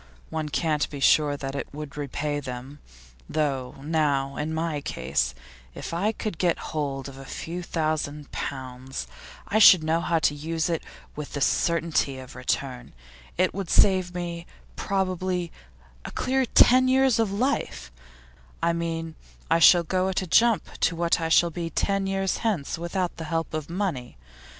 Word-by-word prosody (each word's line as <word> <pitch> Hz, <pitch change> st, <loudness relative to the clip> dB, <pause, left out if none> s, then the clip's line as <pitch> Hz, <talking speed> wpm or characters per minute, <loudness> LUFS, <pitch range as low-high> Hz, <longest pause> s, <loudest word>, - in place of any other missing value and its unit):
One 155 Hz, -1 st, -2 dB
can't 150 Hz, -1 st, 0 dB
be 145 Hz, -, -7 dB
sure 145 Hz, +1 st, +4 dB
that 135 Hz, -1 st, -5 dB
it 140 Hz, -, -5 dB
would 150 Hz, -1 st, -8 dB
repay 145 Hz, +1 st, -2 dB
them, 130 Hz, +1 st, -7 dB, 0.5 s
though 135 Hz, -5 st, -1 dB
Now, 145 Hz, -3 st, 0 dB
in 150 Hz, +2 st, -3 dB
my 160 Hz, -1 st, -1 dB
own -, -, -5 dB
case, 65 Hz, -, -1 dB, 0.4 s
if -, -, -6 dB
I 195 Hz, +6 st, +1 dB
could 215 Hz, -5 st, -5 dB
get 175 Hz, -2 st, +2 dB, 0.2 s
hold 140 Hz, -3 st, -2 dB
of 135 Hz, -1 st, -10 dB
a -, -, -8 dB
few 170 Hz, +6 st, -6 dB
thousand 155 Hz, -3 st, -2 dB
pounds 130 Hz, -1 st, -5 dB, 0.4 s
I 215 Hz, -, +2 dB
should 185 Hz, -6 st, +9 dB
know 160 Hz, +2 st, +1 dB
how 170 Hz, -1 st, +1 dB
to 150 Hz, -2 st, +2 dB
use 160 Hz, +3 st, -2 dB
it 165 Hz, -, -1 dB, 0.3 s
with 150 Hz, -1 st, -7 dB
the 145 Hz, -, -2 dB
certainty 165 Hz, -3 st, +1 dB
of 130 Hz, -1 st, -10 dB
return; 125 Hz, 0 st, -3 dB, 0.4 s
it 185 Hz, +1 st, +2 dB
would 195 Hz, -3 st, -4 dB
save 185 Hz, -2 st, +4 dB
me, 170 Hz, -1 st, -4 dB, 0.3 s
probably, 185 Hz, -2 st, -1 dB, 0.5 s
a -, -, -6 dB
clear 260 Hz, 0 st, 0 dB
ten 255 Hz, +3 st, +6 dB
years 260 Hz, -2 st, +4 dB
of 220 Hz, -3 st, +1 dB
life; 200 Hz, -, -1 dB, 0.7 s
I 170 Hz, -, +3 dB
mean, 165 Hz, -1 st, -3 dB, 0.4 s
I 165 Hz, -, +5 dB
should 170 Hz, 0 st, +7 dB
go 185 Hz, +1 st, +1 dB
at 190 Hz, 0 st, -1 dB
a -, -, -4 dB
jump 225 Hz, +2 st, +2 dB
to 170 Hz, -, +2 dB
what 170 Hz, 0 st, +1 dB
I 165 Hz, -, -1 dB
shall 170 Hz, +1 st, +4 dB
be 170 Hz, 0 st, -4 dB
ten 195 Hz, +4 st, 0 dB
years 195 Hz, 0 st, 0 dB
hence 200 Hz, -11 st, -1 dB
without 175 Hz, +1 st, -2 dB
the 160 Hz, -, -5 dB
help 165 Hz, 0 st, -2 dB
of 155 Hz, -1 st, -4 dB
money. 170 Hz, -, -3 dB
165 Hz, 170 wpm, -26 LUFS, 145-185 Hz, 0.7 s, should